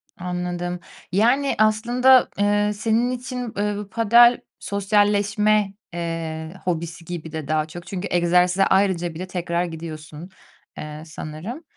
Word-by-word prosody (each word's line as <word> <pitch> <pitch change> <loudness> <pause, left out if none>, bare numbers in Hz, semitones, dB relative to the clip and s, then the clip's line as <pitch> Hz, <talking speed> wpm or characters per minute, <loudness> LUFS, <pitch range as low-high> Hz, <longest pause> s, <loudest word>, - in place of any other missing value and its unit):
Anladım. 180 0 -4 0.3
Yani, 245 +8 +2
aslında, 240 +4 +4
eee, 205 0 +2
senin 225 +3 +1
için, 250 -2 -5
eee, 210 +1 0
bu 205 -1 -7
padel 235 +2 +5 0.2
sosyalleşme, 205 0 +1 0.2
eee, 165 -1 -4
hobisi 170 -1 -3
gibi 165 -2 -6
de 155 -3 -5
daha 155 0 +1
çok. 175 +3 -10
Çünkü 195 0 -4
egzersize 180 +2 +3
ayrıca 185 -3 +1
bile 185 +3 -6
tekrar 175 -1 -2
gidiyorsun, 160 0 -8 0.5
eee, 150 0 -7
sanırım. 160 - -7
185 Hz, 120 wpm, -22 LUFS, 170-215 Hz, 0.5 s, padel